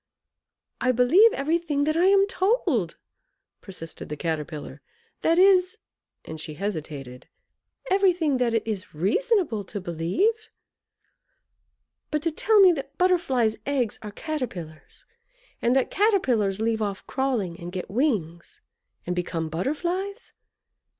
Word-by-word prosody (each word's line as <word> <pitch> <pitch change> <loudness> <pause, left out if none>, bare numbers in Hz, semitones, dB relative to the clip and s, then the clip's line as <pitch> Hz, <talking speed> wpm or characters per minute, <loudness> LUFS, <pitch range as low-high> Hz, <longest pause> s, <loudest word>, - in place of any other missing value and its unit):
"I 255 - +3
believe 275 - +5
everything 305 0 0
that 310 +1 0
I 345 +2 +3
am 395 0 +5
told" 370 - 0 0.6
persisted 175 -4 -9
the 150 - -5
Caterpillar; 150 -3 -4 0.4
"that 330 +1 +2
is" 370 +1 +5 0.5
and 160 -1 -7
she 155 -1 -7
hesitated 150 -9 -6 0.6
"everything 360 -7 +3
that 240 -2 +1
it 225 - 0
is 205 -6 -5
reasonable 285 - +1
to 205 +2 -6
believe. 190 - -1 1.6
But 300 -1 -2
to 330 - +1
tell 425 +7 +3
me 375 -2 +8
that 280 -3 -5
Butterflies' 300 -12 +2
eggs 260 -6 -1
are 215 - -7
Caterpillars, 200 - -6 0.6
and 240 +2 +2
that 265 - +1
Caterpillars 250 - +2
leave 220 0 0
off 200 -2 -3
crawling 235 -11 -2
and 175 +1 -7
get 185 -1 -5
wings, 195 - -2 0.5
and 180 - -2
become 165 -2 -3
Butterflies! 345 - -3
250 Hz, 125 wpm, -25 LUFS, -, 1.6 s, me